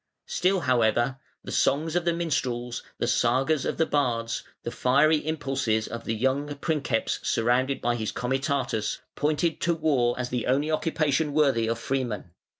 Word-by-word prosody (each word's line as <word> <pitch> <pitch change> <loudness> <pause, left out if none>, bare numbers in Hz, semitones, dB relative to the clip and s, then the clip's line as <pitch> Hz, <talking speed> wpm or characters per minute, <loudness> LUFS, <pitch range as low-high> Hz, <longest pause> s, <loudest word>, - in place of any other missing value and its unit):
Still, 185 0 +1
however, 120 0 +2 0.2
the - - -7
songs 155 +4 +1
of 175 -1 +1
the 170 - +3
minstrels, 125 -8 -2 0.2
the - - -1
sagas 130 +5 +2
of - - -2
the 160 - +3
bards, 120 -6 0 0.2
the 120 - -3
fiery 145 +6 +3
impulses 135 -8 -1
of 115 0 -7
the 115 - -1
young 135 +5 0
princeps 140 -6 -1
surrounded 125 +4 +1
by 120 - +1
his 110 -2 -2
comitatus 130 -3 -1 0.2
pointed 155 +2 0
to 170 0 +2
war 140 -7 +2
as 125 -1 -2
the 125 -2 -2
only 140 +5 +1
occupation 155 -2 0
worthy 135 -7 +3
of 115 0 0
freemen. 120 -8 -3
135 Hz, 155 wpm, -26 LUFS, 120-155 Hz, 0.2 s, the